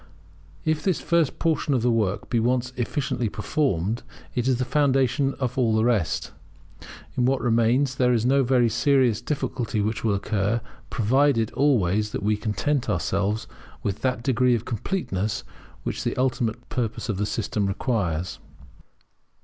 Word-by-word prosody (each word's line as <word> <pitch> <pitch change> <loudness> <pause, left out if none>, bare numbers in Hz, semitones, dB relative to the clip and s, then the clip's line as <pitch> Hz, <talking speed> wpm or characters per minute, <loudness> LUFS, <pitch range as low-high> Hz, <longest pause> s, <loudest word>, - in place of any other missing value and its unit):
If 155 -1 +1
this 185 0 +1
first 170 -4 +1
portion 155 -3 +1
of 120 - 0
the 125 - +3
work 105 -4 0
be 120 - +1
once 125 +2 0
efficiently 125 -2 -1
performed, 115 - -1 0.3
it 125 0 -1
is 130 -2 +3
the 130 - -1
foundation 135 -1 +2
of 130 -1 -2
all 115 -3 +3
the 110 - +3
rest. 115 -9 0 0.8
In 125 - +2
what 135 +1 +2
remains 120 +3 +2
no 125 +2 +3
very 125 -1 +3
serious 130 -2 +2
difficulty 125 -6 -2
will 110 0 0
occur, 105 +2 0 0.3
provided 120 0 +2
always 110 -7 +2
that - - -3
we 105 +1 +2
content 120 +6 -1
ourselves 100 +5 0 0.4
with 100 - -2
that 130 -3 0
degree 125 0 +3
of 115 0 -4
completeness 110 - -2 0.4
which - - -3
the - - -2
ultimate 125 -3 -1
purpose 120 0 -2
of 105 -5 -1
the 105 +1 0
system 105 -2 -1
requires. 95 -5 -1
120 Hz, 145 wpm, -25 LUFS, 105-130 Hz, 0.8 s, the